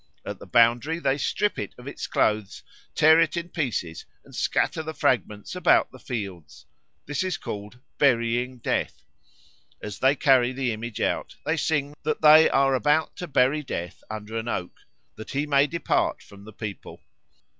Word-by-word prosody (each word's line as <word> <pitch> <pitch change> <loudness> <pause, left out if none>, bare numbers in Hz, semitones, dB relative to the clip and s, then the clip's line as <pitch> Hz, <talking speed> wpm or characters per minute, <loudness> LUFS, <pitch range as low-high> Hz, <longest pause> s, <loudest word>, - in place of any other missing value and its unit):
At - - -6
the - - -12
boundary 120 +7 +3
they 140 -3 0
strip 210 +7 0
it - - -6
of 125 - -13
its 140 - -6
clothes, 105 -2 0 0.3
tear 160 +1 +6
it 165 0 +2
in 170 0 -4
pieces, 115 - -3 0.2
and - - -14
scatter - - 0
the 160 0 -6
fragments 120 - -1
about 180 - +3
the 130 - -14
fields. 95 - -7 0.4
This 145 0 -2
is 185 -3 -2
called 105 +3 -7 0.2
"Burying 125 -1 +2
Death." 120 - -2 0.8
As 105 -2 -7
they 135 +2 +4
carry 130 -3 +3
the 130 -2 -1
image 115 +1 -6
out, - - -1
they 160 - +1
sing 145 -2 -1
that 155 0 -2
they 155 +1 +8
are 135 0 +3
about 145 +6 +1
to 180 - -5
bury 135 +1 +2
Death 90 -11 -6
under 110 +1 -7
an 115 +1 -4
oak, 90 -6 -3 0.4
that 110 - -9
he 140 +2 -1
may 140 -1 +3
depart 170 +2 -1
from 100 0 -15
the 110 - -12
people. 105 -1 -8
130 Hz, 170 wpm, -25 LUFS, 110-150 Hz, 0.8 s, they